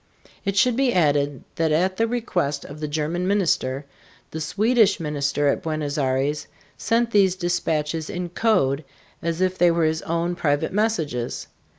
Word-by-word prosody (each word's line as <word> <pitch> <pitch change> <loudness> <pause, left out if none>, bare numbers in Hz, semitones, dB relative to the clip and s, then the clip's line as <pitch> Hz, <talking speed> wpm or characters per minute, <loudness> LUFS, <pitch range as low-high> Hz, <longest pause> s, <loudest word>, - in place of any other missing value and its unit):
It 200 0 -1
should 245 +4 +4
be 265 0 +2
added 145 -4 +1
that 160 -1 +1
at 185 +5 +1
the 225 - +2
request 175 -12 -1
of 145 +2 -9
the 150 - -3
German 160 +4 -2
minister, 155 -9 +1 0.5
the 160 - -5
Swedish 210 +5 +3
minister 145 -2 0
at 140 - +1
Buenos 155 -3 -3
Aires 140 +2 0 0.3
sent 230 +1 +1
these 195 -4 +4
dispatches 165 -3 -1
in 175 0 -4
code 160 -8 +1 0.4
as 170 +1 -2
if 185 0 0
they 175 0 +6
were 165 -1 +2
his 160 0 0
own 170 +1 -1
private 150 -1 0
messages. 165 - -1
165 Hz, 160 wpm, -23 LUFS, 145-190 Hz, 0.5 s, they